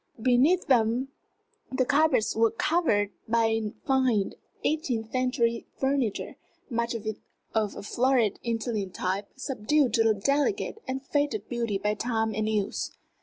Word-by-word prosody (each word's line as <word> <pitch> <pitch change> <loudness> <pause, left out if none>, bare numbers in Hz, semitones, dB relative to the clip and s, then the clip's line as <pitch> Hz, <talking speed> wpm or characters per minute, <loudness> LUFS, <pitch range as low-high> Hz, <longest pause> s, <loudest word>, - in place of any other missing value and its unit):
Beneath 260 +10 +3
them 245 +1 +2 0.6
the 260 0 +1
carpets 285 -4 +3
were 225 +1 +4
covered 225 - +1 0.2
by 225 0 +2 0.2
fine 260 -7 +2 0.3
eighteenth 245 -8 -1
century 245 -2 0
furniture, 265 -5 -1 0.3
much 235 0 -1
of 225 -1 -5
it 215 -1 -2 0.4
of 215 -2 0
a - - -7
florid 240 -1 +2
Italian 225 -4 -2
type 190 +2 -2
subdued 270 0 +1
to 225 -1 +4
a 215 - +3
delicate 290 - 0
and 265 +1 -4
faded 285 -9 0
beauty 235 -4 -1
by 210 +2 0
time 220 0 -1
and 215 +1 -1
use. 210 -2 -1
235 Hz, 135 wpm, -27 LUFS, 215-265 Hz, 0.6 s, were